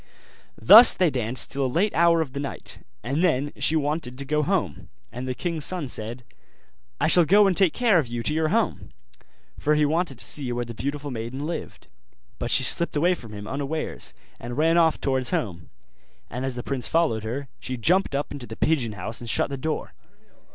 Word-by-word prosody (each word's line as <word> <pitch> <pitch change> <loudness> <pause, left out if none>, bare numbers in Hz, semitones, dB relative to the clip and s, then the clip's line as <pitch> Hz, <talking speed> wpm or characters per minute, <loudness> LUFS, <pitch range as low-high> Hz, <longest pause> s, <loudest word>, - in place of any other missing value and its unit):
Thus 230 +3 +10
they 180 -4 +2
danced 125 -1 -1
till 140 0 -2
a - - +1
late 180 +11 0
hour 170 0 +3
of 140 -5 -5
the 140 - -4
night; 140 - -5 0.2
and 140 +8 -1
then 145 -4 0
she 160 - +2
wanted 145 -4 -2
to 140 - -4
go 150 +2 0
home: 150 - -2 0.2
and 125 +2 -6
the 130 - -3
king's 165 +2 -3
son 175 -4 0
said, 120 +1 -5 0.8
'I - - +2
shall 175 - +6
go 205 +6 +5
and 190 -2 +2
take 190 -3 +4
care 225 -7 +3
of 145 - -2
you 120 0 -5
to 150 - -1
your 160 0 0
home'; - - -1 0.7
for 150 +1 +1
he 150 0 +3
wanted 160 -2 -1
to 105 - -6
see 125 +3 -2
where 120 0 -3
the 120 - -8
beautiful 140 +5 -5
maiden 120 +4 -5
lived. 170 - -7 0.5
But - - -3
she - - +5
slipped 170 - +1
away 175 +5 +3
from 115 -11 -9
him, 105 -1 -8
unawares, 145 +3 -3 0.2
and 120 +2 -7
ran 165 +2 +3
off 165 -2 +3
towards 130 -2 -1
home; 85 -7 -4 0.6
and 125 +3 -4
as 130 -2 -3
the 120 - -5
prince 135 -3 -1
followed 160 -10 +1
her, 130 +6 -5
she 130 - -5
jumped 175 - +1
up 145 - -3
into 140 -4 -7
the 110 - -8
pigeon 130 -8 0
house 105 +4 -6
and 120 - -6
shut 140 - +1
the - - -2
door. 155 +4 -4
140 Hz, 210 wpm, -24 LUFS, 120-160 Hz, 0.8 s, Thus